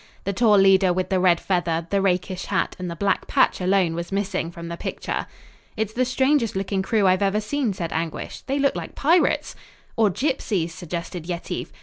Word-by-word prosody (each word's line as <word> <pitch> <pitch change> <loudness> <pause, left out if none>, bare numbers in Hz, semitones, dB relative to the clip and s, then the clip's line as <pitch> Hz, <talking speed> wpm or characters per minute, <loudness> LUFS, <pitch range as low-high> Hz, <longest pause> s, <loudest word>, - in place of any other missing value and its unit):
The 200 - -2
tall 215 0 +4
leader 195 -1 +5
with 185 +1 -1
the 190 -2 +2
red 180 -2 +4
feather, 170 -3 -1
the 200 -1 +2
rakish 185 -1 0
hat 190 -3 -1
and 180 -1 -4
the 170 - -5
black 195 +2 0
patch - - +2
alone 185 -2 +2
was 170 +2 -5
missing; 195 -3 -1
from 170 0 -8
the 170 - -4
picture. - - -4 0.5
"It's 215 0 -2
the 255 +2 +1
strangest 260 -2 +1
looking 195 0 -1
crew 210 +1 +1
I've 185 0 +3
ever 200 +1 +2
seen," 245 +2 -1
said 170 -4 -4
Anguish. 160 0 -4
"They 275 +1 0
look 280 -1 +2
like - - -6
pirates." 330 +5 +2 0.4
"Or 220 -2 +4
gypsies" 205 - -1
suggested 170 -1 -6
Yetive. 175 -1 -4
190 Hz, 195 wpm, -23 LUFS, 175-210 Hz, 0.5 s, leader